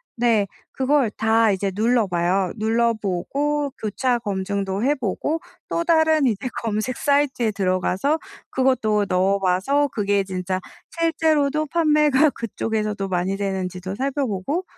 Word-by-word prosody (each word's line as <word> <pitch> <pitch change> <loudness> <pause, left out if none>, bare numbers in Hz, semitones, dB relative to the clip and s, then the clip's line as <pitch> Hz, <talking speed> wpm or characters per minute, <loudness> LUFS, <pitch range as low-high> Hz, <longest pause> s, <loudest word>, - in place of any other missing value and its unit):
네, 230 -4 +2 0.2
그걸 265 -2 +2
다 220 0 +3
이제 195 0 -1
눌러봐요. 195 -5 +1
눌러보고 235 +6 0
교차 240 +3 0
검증도 200 -1 -2
해 290 +2 +3
보고 265 - -2 0.3
또 335 - -1
다른 315 -3 +3
이제 220 0 -1 0.2
검색 220 +3 -1
사이트에 280 -6 +1
들어가서 195 - 0 0.3
그것도 220 -6 +1
넣어봐서 195 +9 +2
그게 200 -3 0
진짜 185 0 -3 0.4
실제로도 310 -3 +1
판매가 300 -2 +3
그쪽에서도 215 -3 -3
많이 185 +1 0
되는지도 190 -1 -3
살펴보고 275 - -2
220 Hz, 285 characters per minute, -22 LUFS, 195-280 Hz, 0.4 s, 다